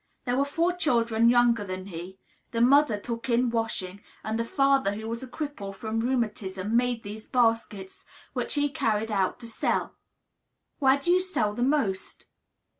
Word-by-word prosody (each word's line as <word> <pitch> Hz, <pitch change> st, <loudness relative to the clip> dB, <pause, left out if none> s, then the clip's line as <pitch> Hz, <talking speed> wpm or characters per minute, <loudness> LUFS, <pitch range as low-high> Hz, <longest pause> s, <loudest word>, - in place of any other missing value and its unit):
There 245 Hz, -, 0 dB
were 275 Hz, +2 st, +2 dB
four 335 Hz, +5 st, 0 dB
children 235 Hz, -9 st, +2 dB
younger 240 Hz, -2 st, +4 dB
than 185 Hz, -1 st, -6 dB
he; 180 Hz, 0 st, -8 dB, 0.3 s
the 230 Hz, -, -3 dB
mother 255 Hz, -1 st, +5 dB
took 235 Hz, +2 st, -5 dB
in 240 Hz, 0 st, +2 dB
washing, 205 Hz, -4 st, -3 dB, 0.2 s
and 220 Hz, +1 st, -2 dB
the -, -, +1 dB
father, 275 Hz, -3 st, +2 dB
who 220 Hz, +1 st, -6 dB
was 230 Hz, +1 st, -4 dB
a 260 Hz, -, -7 dB
cripple 245 Hz, -8 st, -6 dB
from 220 Hz, +2 st, -3 dB
rheumatism, 215 Hz, -4 st, -1 dB
made 245 Hz, -1 st, +1 dB
these 215 Hz, +2 st, -8 dB
baskets, 225 Hz, -5 st, 0 dB, 0.3 s
which -, -, -1 dB
he 290 Hz, 0 st, +2 dB
carried 225 Hz, -6 st, -1 dB
about 195 Hz, -3 st, 0 dB
to 235 Hz, -, -7 dB
sell. 225 Hz, -, -1 dB, 0.9 s
"Where 270 Hz, -1 st, +5 dB
do 315 Hz, +5 st, 0 dB
you 365 Hz, +1 st, +4 dB
sell 290 Hz, -, -1 dB
the 240 Hz, -, -5 dB
most?" 250 Hz, -8 st, -1 dB
230 Hz, 170 wpm, -27 LUFS, 210-265 Hz, 0.9 s, mother